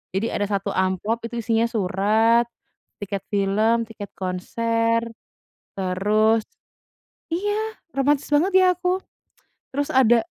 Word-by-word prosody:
Jadi 220 +4 0
ada 205 - 0
1 200 -1 -1
amplop 190 +5 0
itu 235 +1 -4
isinya 225 +1 +2
surat, 220 +3 +2 0.6
tiket 200 -1 -4
film, 210 +4 +2
tiket 205 -3 -9
konser 230 +5 0 0.8
terus 210 +4 +2 0.9
iya, 415 +4 -2 0.2
romantis 275 +1 +2
banget 325 +7 +3
ya 375 - +6
aku. 360 0 0 0.8
Terus 285 0 -1
ada 240 -3 +5
225 Hz, 110 wpm, -23 LUFS, 200-240 Hz, 0.9 s, ya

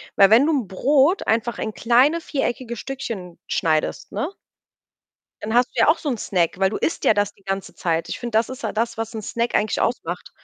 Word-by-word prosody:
Weil, 195 0 +7
wenn 245 +6 +7
du 320 - +3
'n 250 -9 0
Brot 280 - +2
einfach 230 +1 0
in 220 -1 -3
kleine, 255 +8 +3
viereckige 255 -6 -3
Stückchen 230 -8 -6
schneidest, 160 - 0
ne 325 +7 -3 1.1
dann 220 +1 -3
hast 245 +1 +4
du - - -5
ja - - +5
auch 315 +2 +5
so 300 - -3
'n 245 - -1
Snack, 180 -3 0
weil 190 0 +3
du - - -3
isst 330 - -2
ja - - +5
das 205 0 0
die 200 - -28
ganze 195 0 -4
Zeit. 165 -1 -1
Ich - - -4
finde, 235 -3 -1
das 225 - +1
ist 260 +2 -8
halt - - -3
das, 230 0 -1
was 225 +1 -4
'n 220 - -5
Snack 235 +3 -2
eigentlich 210 -1 +1
ausmacht. 180 -7 -2
230 Hz, 225 wpm, -22 LUFS, 200-265 Hz, 1.1 s, Weil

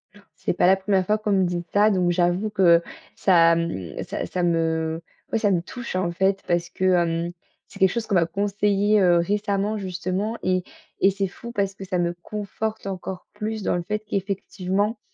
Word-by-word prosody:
Ouh - - -15
là! 205 - -22
C'est - - -2
pas 175 - +3
la 190 - +7
1re 190 -1 +1
fois 210 +3 +2
qu'on 215 -1 -2
me 190 -1 +3
dit 175 -1 -2
ça, 210 +1 +5
donc 180 -4 +2
j'avoue 175 +4 +1
que 175 -5 +5 0.3
ça, 170 -3 +5
mmh, 165 - -3
ça - - -4
ça 180 - -2
me 165 -1 0 0.3
ouais 225 - +1
ça 205 -2 +2
me 175 -3 +2
touche 235 +3 -7
en 185 -2 0
fait, 190 +2 +1
parce 175 -1 0
que, 185 - -6
hem, 170 -2 +2 0.4
c'est 200 - -14
quelque 190 -2 +5
chose 235 +1 -2
qu'on 200 - +1
m'a 170 -2 +4
conseillé, 205 +2 +1
heu, 175 -2 +5
récemment 205 +3 0
justement 190 +3 -3
et 185 0 +1 0.4
et 195 - +5
c'est 195 0 -1
fou 235 +5 -9
parce 200 -4 -1
que 195 0 -9
ça 180 -1 -1
me 175 0 0
conforte 215 +2 -4
encore 185 -1 -6
plus 215 0 -4
dans - - +1
le 175 - -2
fait 210 +4 -2
qu'effectivement, 195 +2 -2
190 Hz, 205 wpm, -24 LUFS, 175-205 Hz, 0.4 s, la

